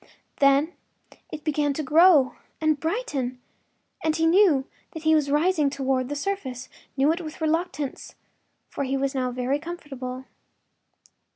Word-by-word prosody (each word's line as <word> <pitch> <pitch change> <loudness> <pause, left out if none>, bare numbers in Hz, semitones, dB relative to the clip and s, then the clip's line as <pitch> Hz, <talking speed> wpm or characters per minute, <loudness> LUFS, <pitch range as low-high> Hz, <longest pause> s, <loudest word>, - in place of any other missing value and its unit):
Then 280 +4 +3 0.6
it 310 - -7
began 295 -2 0
to 310 - -3
grow 305 -2 +5 0.3
and 310 -2 +1
brighten, 295 - -2 0.6
and 315 -1 +1
he 325 0 +1
knew 330 -6 +4 0.3
that 320 - -7
he 315 0 +4
was 300 -3 +2
rising 300 0 +2
toward 265 -2 -1
the 290 - -3
surface—knew 280 -4 -2
it 340 +3 -2
with 310 -2 -8
reluctance, 315 -3 -2 0.5
for - - -4
he 270 0 -1
was 275 +1 -1
now 255 -2 -1
very 250 +3 -1
comfortable. 270 -6 -7
295 Hz, 135 wpm, -25 LUFS, 270-320 Hz, 0.6 s, grow